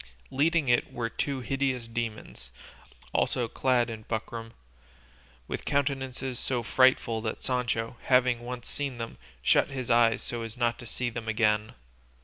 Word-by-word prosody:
Leading 150 +2 +2
it 120 0 +3
were 115 -1 -3
two 140 -2 -2
hideous 130 -2 -1
demons, 115 - -5 0.6
also 120 -2 +1
clad 125 0 +2
in 110 -2 -6
buckram, 115 0 -4 0.9
with - - -4
countenances 135 -2 -1
so 125 -3 -1
frightful 115 -2 +4
that 110 -1 -4
Sancho, 120 -2 -1
having 125 -2 +4
once 120 0 -6
seen 140 -4 -3
them, 115 -1 -6 0.2
shut - - +4
his 130 -3 -3
eyes 115 -1 +4
so 120 -1 -3
as 115 +1 -6
not 120 -1 +1
to 120 - -8
see 120 +2 -2
them 115 -1 -6
again. 110 -1 +2
120 Hz, 145 wpm, -29 LUFS, 115-130 Hz, 0.9 s, frightful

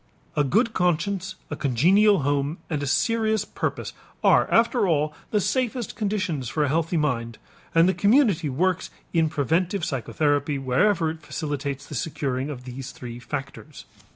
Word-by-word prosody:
A 150 - +3
good 215 - +2
conscience, 185 +2 0 0.2
a - - -1
congenial 180 - +4
home, 145 +3 0
and 150 -2 -1
a 145 - -2
serious 220 - +1
purpose - - -4 0.3
are - - +5
after 230 -2 +3
all 150 -2 +1 0.2
the 210 - +2
safest 250 +1 -1
conditions 185 - -2
for 150 +7 0
a 145 - +1
healthy 165 +3 0
mind, 115 -7 -1 0.4
and 165 +1 +6
the 190 - +3
community 200 - +3
works 180 +7 0 0.2
in 165 -2 +3
preventive 170 - 0
psychotherapy 145 +2 0
wherever 160 +6 +2
it 160 0 -10
facilitates 145 -2 -4
the - - -10
securing 135 -1 -2
of 130 -4 -7
these 125 +1 -7
three 120 -1 -8
factors. 135 +2 -7
155 Hz, 155 wpm, -24 LUFS, 140-195 Hz, 0.4 s, and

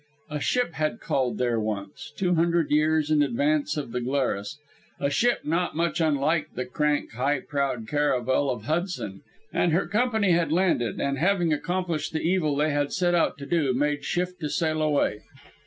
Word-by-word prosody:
A 150 - -2
ship 245 - 0
had 155 -6 -1
called 125 -5 -1
there 120 -2 +1
once, 105 -2 -5
two 180 -2 +1
hundred 170 -1 +2
years 155 0 +2
in 150 -1 +4
advance 145 +3 +1
of 140 -5 -4
the 125 - -2
Glarus 125 -6 -1 0.4
a 140 0 0
ship 240 +11 +2
not 170 +3 -1
much 170 +1 0
unlike 155 +1 +1
the 125 - -2
crank 150 +3 0
high 135 +4 0
prowed 135 -6 -2
caravel 135 -1 +1
of 120 -5 -3
Hudson, 155 - -3 0.3
and 170 - +2
her 175 - +2
company 220 -3 +1
had 170 -1 +2
landed, 165 - +1
and 140 -1 -1
having 175 -1 +2
accomplished 175 0 -2
the 160 - -1
evil 165 -4 +1
they 150 +2 +1
had 145 0 0
set 175 -2 +1
out 170 - +2
to 140 - -8
do, 140 -4 +1
made 145 +2 0
shift 180 +1 -2
to 150 -3 -3
sail 155 -1 0
away. 145 -8 +1
150 Hz, 180 wpm, -26 LUFS, 135-170 Hz, 0.4 s, in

